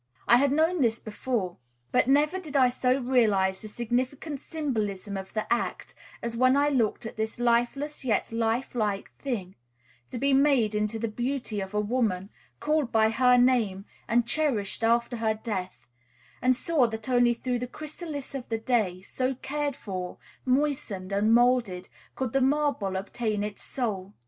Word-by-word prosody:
I 240 - +7
had 275 +1 +3
known 320 +3 +2
this 230 -2 +2
before; 215 -4 -3 0.3
but - - +3
never 300 +7 +3
did 310 -6 -9
I 260 -2 +5
so 250 +1 +1
realize 210 -7 +2
the 215 - -7
significant 255 +6 -2
symbolism 215 - -3
of 190 0 -6
the 215 - 0
act 235 - -3 0.3
as 235 0 -3
when 255 +3 +4
I 290 +1 +3
looked 240 -5 0
at 220 - -7
this 220 +2 -2
lifeless 240 +5 0
yet 230 -4 0
lifelike 225 -2 -1
thing, 210 -9 -3 0.6
to - - -5
be 275 +3 +2
made 270 -6 +4
into 210 +1 -1
the 230 +1 -2
beauty 240 -1 -2
of 190 +2 -6
a - - +2
woman, 210 -3 0 0.3
called 300 -4 0
by 220 0 +4
her 250 +2 +5
name, 230 -6 +2 0.2
and 235 +1 +3
cherished 235 -8 -1
after 235 +1 +2
her 220 -1 +1
death, 190 - -5 0.6
and 255 0 +4
saw 285 -2 +2
that 220 0 -6
only 245 -1 +4
through 245 +1 -2
this 250 0 -4
chrysalis 305 -2 -7
of 265 -3 -6
the 225 - 0
clay, 220 -6 0
so 255 +5 -2
cared 285 +2 -3
for, 185 -3 -6 0.3
moistened, 255 -9 0
and 205 +2 +2
moulded, 235 -6 +3 0.3
could 260 -3 -3
the 270 - +3
marble 270 -8 +1
obtain 210 +2 -2
its 210 -1 -5
soul. 205 -6 -3
240 Hz, 165 wpm, -27 LUFS, 210-265 Hz, 0.6 s, I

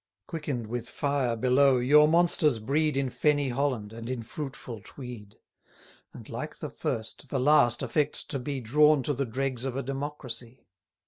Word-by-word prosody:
Quicken'd 145 -8 -4
with 120 +2 -5
fire 140 -5 0
below, 130 +3 +4
your 150 +5 +6
monsters 160 -5 +4
breed 145 +6 0
In 135 -2 0
fenny 145 -1 +1
Holland, 125 -5 -1
and 115 +1 -7
in 125 -3 -3
fruitful 125 -3 -7
Tweed: 120 -6 -10 0.7
And, - - -12
like - - -6
the - - -6
first, 115 +4 -4
the 135 - -1
last 130 -3 +4
affects 145 +4 +2
to 140 - -4
be 135 +1 -4
210 115 +1 -11
Drawn 150 -2 +5
to 145 - 0
the 135 -3 -3
dregs 130 -1 -2
of 135 -2 -3
a 135 - -2
democracy. 135 -3 -5
135 Hz, 170 wpm, -28 LUFS, 120-145 Hz, 0.7 s, your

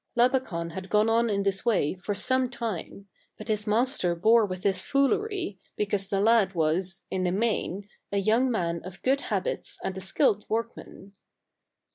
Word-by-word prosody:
Labakan 240 -10 +1
had 190 +2 -7
gone 210 +1 +3
on 230 +1 +2
in 200 -1 0
this 195 -1 0
way 215 -11 +1
for 185 +3 -4
some 260 +4 +2
time; 220 -5 -5 0.3
but 215 - -10
his 210 -1 0
master 210 -5 +1
bore 220 +5 +4
with 185 -1 -6
his 190 -2 +1
foolery, 280 - 0 0.2
be 210 - +1
cause 200 -1 -2
the 195 0 -1
lad 210 -3 +3
was, 170 +4 0
in 190 - -1
the 180 - +1
main, 205 -1 -1 0.2
a 200 - 0
young 225 +6 +2
man 170 -7 -1
of 185 +1 -10
good 270 +2 +2
habits - - -3
and 190 - -3
a 190 - -6
skilled 210 +2 +1
workman. 220 -3 -5
205 Hz, 175 wpm, -27 LUFS, 190-235 Hz, 0.3 s, bore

